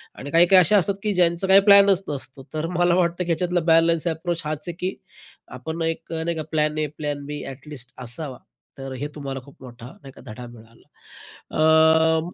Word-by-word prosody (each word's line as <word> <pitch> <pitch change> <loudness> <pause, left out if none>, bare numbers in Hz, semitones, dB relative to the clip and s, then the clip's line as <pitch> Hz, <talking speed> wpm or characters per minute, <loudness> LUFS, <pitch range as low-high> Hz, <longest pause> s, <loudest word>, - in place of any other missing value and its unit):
आणि 140 - -8
काही-काही 175 +3 +6
अशा 185 +4 +4
असतात 195 +1 +1
की 210 -1 0
ज्यांचं 175 0 +1
काही 190 +1 +7
प्लॅनच 200 -2 +6
नसतो 135 -2 -7
तर 155 +1 -2
मला 175 0 +3
वाटतं 175 0 0
की 175 - -8
याच्यातला 175 +2 0
बॅलन्स 165 0 +3
अप्रोच 170 +1 -3
हाच 155 0 -4
आहे 175 - -4
की 185 +1 -3 0.6
आपण 160 +6 -6
एक 165 0 -3
नाही 165 +1 -2
का 155 - -3
plan 155 -1 0
A, 155 0 0
plan 145 -1 -4
B 145 +1 -6
at least 135 -2 -10
असावा. 125 +2 -4 0.4
तर 135 0 -7
हे 140 +3 -4
तुम्हाला 135 -2 -5
खूप 140 - -16
मोठा 120 -2 -12
नाही 135 -2 -14
का - - -15
धडा 120 +3 -9
मिळाला? 115 -1 -17 0.6
अ, 160 +1 +4
160 Hz, 190 wpm, -22 LUFS, 140-175 Hz, 0.6 s, काही